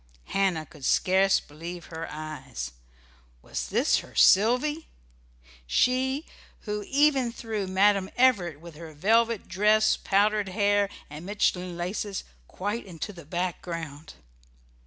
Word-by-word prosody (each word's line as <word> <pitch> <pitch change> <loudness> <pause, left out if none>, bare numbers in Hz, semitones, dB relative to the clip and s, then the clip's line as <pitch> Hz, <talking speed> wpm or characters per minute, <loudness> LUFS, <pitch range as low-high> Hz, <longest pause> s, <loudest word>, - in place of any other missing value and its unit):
Hannah 190 -5 +1
could 150 -2 -16
scarce 190 +6 +3
believe 170 +4 -9
her 160 +1 -5
eyes. 140 - -6 0.7
Was 65 -1 -4
this - - +2
her - - -13
Sylvy? 250 +10 +4 0.8
she 265 - +1 0.4
who 210 -1 -4
even 275 -3 +3
threw 220 -4 -4
Madam 195 0 +3
Everett, 195 - +3
with 170 0 -11
her 160 -1 -10
velvet 225 +6 +2
dress, 215 +3 +3
powdered 205 0 +2
hair, 205 0 +2 0.2
and 150 +3 -9
Mechlin 180 -3 -1
laces, 190 +3 -3 0.2
quite 205 +4 -4
into 180 +3 -6
the 170 -4 -12
background! 165 -3 -5
195 Hz, 115 wpm, -27 LUFS, 165-215 Hz, 0.8 s, Sylvy